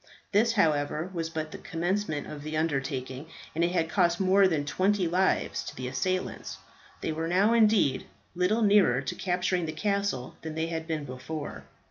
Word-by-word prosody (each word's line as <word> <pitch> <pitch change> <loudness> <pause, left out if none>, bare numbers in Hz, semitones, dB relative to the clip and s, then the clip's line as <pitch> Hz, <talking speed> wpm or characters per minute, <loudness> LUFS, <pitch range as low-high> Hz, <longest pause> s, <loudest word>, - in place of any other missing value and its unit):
This, 225 +3 +3
however, 155 -2 +1
was 165 -2 -2
but 155 -1 -4
the - - -8
commencement 175 -1 -2
of 150 -1 -8
the 155 +1 -4
undertaking, 135 -2 -2 0.3
and 165 - 0
it 170 - +2
had 165 -3 +1
cost 170 0 +2
more 195 +1 +5
than 155 -5 0
twenty 190 +4 +1
lives 185 +3 +1
to - - -7
the 130 0 -4
assailants. 185 +9 -2 0.4
They - - -1
were 160 +1 -2
now, 195 +6 +3
indeed, 215 - +3 0.3
little 185 +6 +1
nearer 200 -12 +5
to 130 - -3
capturing 180 -1 0
the 155 - -3
castle 200 -7 -1
than 160 -1 -6
they 160 0 0
had 160 -1 -4
been 155 -3 -2
before. 135 +4 -6
165 Hz, 175 wpm, -28 LUFS, 150-190 Hz, 0.4 s, more